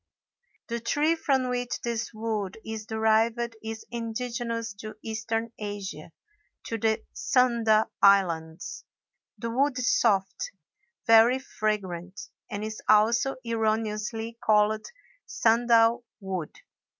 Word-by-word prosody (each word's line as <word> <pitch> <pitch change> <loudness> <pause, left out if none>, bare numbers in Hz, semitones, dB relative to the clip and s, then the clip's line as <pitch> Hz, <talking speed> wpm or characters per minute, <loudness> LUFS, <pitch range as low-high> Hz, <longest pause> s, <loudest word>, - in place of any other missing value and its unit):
The 235 0 -2
tree 295 +7 +2
from 270 -6 +1
which 245 0 -2
this 230 -1 -2
wood 215 -3 -3
is 220 -1 -6
derived 225 +2 +1
is 220 0 -6
indigenous 230 -1 -3
to 215 0 -8
Eastern 225 +1 -3
Asia, 200 -7 -6 0.5
to 225 - -3
the 220 +1 +1
Sunda 235 -4 +3
Islands. 170 -5 +2 0.5
The 230 -1 -4
wood 275 +2 +1
is 255 0 +2
soft, 195 -4 +1 0.5
very 225 +3 +6
fragrant, 200 -7 -3 0.3
and 205 +1 -4
is 215 0 -5
also 230 +5 +4
erroneously 225 0 -1
called 215 0 +3 0.4
sandal 235 - +3 0.2
wood. 190 -6 -5
225 Hz, 105 wpm, -27 LUFS, 215-235 Hz, 0.5 s, very